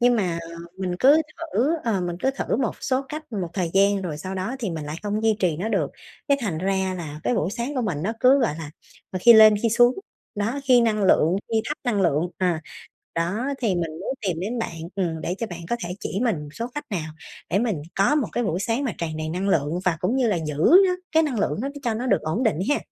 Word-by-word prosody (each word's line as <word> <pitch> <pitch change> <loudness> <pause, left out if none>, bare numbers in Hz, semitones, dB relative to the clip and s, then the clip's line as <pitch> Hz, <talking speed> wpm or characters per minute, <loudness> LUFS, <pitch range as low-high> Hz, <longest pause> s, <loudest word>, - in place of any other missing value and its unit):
nhưng 245 0 +4
mà 180 -6 0 0.4
mình 185 -2 -2
cứ 290 +5 +6 0.3
thử, 275 +9 +3
ờ, 220 -5 +1
mình 175 -1 -3
cứ 265 - +2
thử 270 - -2
một 255 -5 -1
số 260 0 0
cách 305 -4 -8
một 190 -5 -2
thời 175 -2 -1
gian 200 0 +3
rồi 160 -5 -4
sau 185 +4 -5
đó 205 +8 -3
thì 225 -7 -3
mình 160 -3 -5
lại 150 +2 -5
không 210 +1 -2
duy 220 -1 +3
trì 175 -6 +1
nó 195 +6 -2
được. - - 0 0.4
Cái 280 0 +3
thành 195 -10 -2
ra 190 +1 0
là 155 -3 -7
cái - - +1
buổi 190 -5 0
sáng 240 +7 -4
của 255 - 0
mình 175 -9 -2
nó 205 +6 -1
cứ, 265 +2 +6
gọi 230 - +1
là, 155 -3 -7 0.5
khi 235 +5 +9
lên 220 -1 +8
khi 230 - +3
xuống, 240 +3 +4 0.4
đó, 225 +7 -2
khi 255 -2 +6
năng 215 -3 +1
lượng, 180 -1 +4
khi 220 -1 +1
thấp 300 - -3
năng 230 -5 +1
lượng, 165 0 +2
ờ, 185 - +1 0.7
đó, 175 +8 -1
thì 240 - 0
mình 170 -2 -1
muốn 205 - -3
tìm 170 -3 -1
đến 220 +6 -3
bạn, 225 -7 -3 0.2
ừm, 170 -5 -2
để 175 - -2
cho 230 - -2
bạn 175 -4 -8
có 240 - +1
thể 175 - -5
chỉ 195 - -3
mình 170 -12 -1
số 230 +8 -4
khách 295 0 -4
nào 160 -6 -3 0.4
để 190 - +2
mình 210 -9 -1
có 195 +9 +3
một 285 -7 +1
cái 240 - 0
buổi 180 -3 -1
sáng 230 +6 -1
mà 245 - -1
tràn 160 -2 -3
đầy 155 0 -3
năng 180 +5 -2
lượng 160 -2 +1
và 180 -3 +2
cũng 210 +9 +1
như 255 -3 +2
là 205 - +1
giữ 150 - -3 0.3
nó 365 -1 +1 0.2
cái 320 0 +5
năng 265 -8 -1
lượng 205 - 0
đó 270 - -2
cho 235 -4 0
nó 245 +3 -3
được - - +2
ổn 160 +10 -1
định 220 -11 +1
ha. 290 - +3
205 Hz, 255 wpm, -24 LUFS, 175-240 Hz, 0.7 s, khi